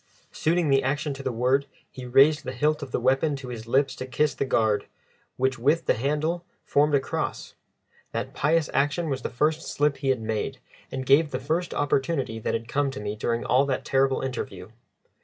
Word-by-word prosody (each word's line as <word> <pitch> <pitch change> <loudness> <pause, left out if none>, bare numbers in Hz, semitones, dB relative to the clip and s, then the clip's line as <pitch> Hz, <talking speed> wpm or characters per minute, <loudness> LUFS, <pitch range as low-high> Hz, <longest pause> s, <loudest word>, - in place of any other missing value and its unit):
Suiting 165 -2 +1
the 135 0 +5
action 140 +2 -1
to 135 - -8
the 130 - -2
word, 130 +4 +1 0.2
he 130 -2 -8
raised 145 +5 +5
the 130 -1 -5
hilt 150 +4 +1
of 140 - -6
the - - 0
weapon 135 +4 +2
to 135 -2 -8
his 115 -2 -7
lips 135 +2 +2
to 130 - -6
kiss 150 +4 +1
the - - -2
guard, 110 -5 +1 0.5
which 130 -1 0
with 150 +7 +2
the - - +4
handle 150 +7 -1 0.2
formed 145 +1 +3
a - - +5
cross. 135 - -4 0.6
That - - -4
pious 160 +1 +2
action 145 +4 +1
was 135 -1 -2
the - - -3
first 155 +6 +1
slip 145 0 +1
he 135 - -2
had 130 -2 +2
made, 110 -1 -2 0.3
and 130 0 -4
gave 145 +4 +5
the 130 - -2
first 160 +6 -1
opportunity 135 -4 0
that 110 - -1
had 115 0 -4
come 140 +3 0
to 135 - -6
me 105 0 -4
during 115 +2 -2
all 135 +2 +3
that 130 - -2
terrible 135 0 +2
interview. 130 -4 -5
135 Hz, 205 wpm, -26 LUFS, 125-150 Hz, 0.6 s, the